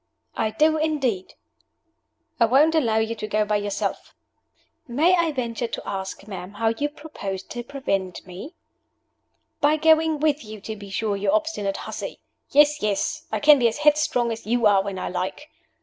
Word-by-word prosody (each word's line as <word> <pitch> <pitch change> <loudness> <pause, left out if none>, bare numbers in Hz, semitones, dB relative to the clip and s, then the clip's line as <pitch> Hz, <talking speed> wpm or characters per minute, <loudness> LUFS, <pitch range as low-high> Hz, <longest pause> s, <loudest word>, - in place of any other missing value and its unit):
"I 220 - 0
do, 310 +8 +3
indeed." 275 -11 -1 1.0
"I 230 - +6
won't 280 +7 +4
allow 235 -9 +2
you 220 +1 +1
to 215 -1 -6
go 215 0 +1
by 210 0 +1
yourself." 205 -1 -3 0.7
"May 310 +9 +3
I 335 -2 +1
venture 240 -3 -3
to - - -6
ask, 195 0 -5
ma'am 190 -1 -7
how 225 +2 +1
you 285 +6 -1
propose 210 -11 -6
to 240 +4 -7
prevent 195 -9 -3
me?" 185 - -9 1.0
"By 305 0 +3
going 315 0 +4
with 300 0 +1
you, 215 -1 -9
to 220 +2 -6
be 200 -1 -10
sure, 205 +1 -1
you 200 +1 -1
obstinate 305 -11 0
hussy! - - -6 0.3
Yes, 295 +1 +4
yes 200 -2 -1
I 215 - 0
can 295 +3 +7
be 240 - +4
as 225 - -2
headstrong 295 -5 +2
as 225 -1 -6
you 235 0 +1
are 200 -2 +5
when 195 -1 -5
I - - -3
like. 185 - -4
230 Hz, 175 wpm, -24 LUFS, 205-300 Hz, 1.0 s, can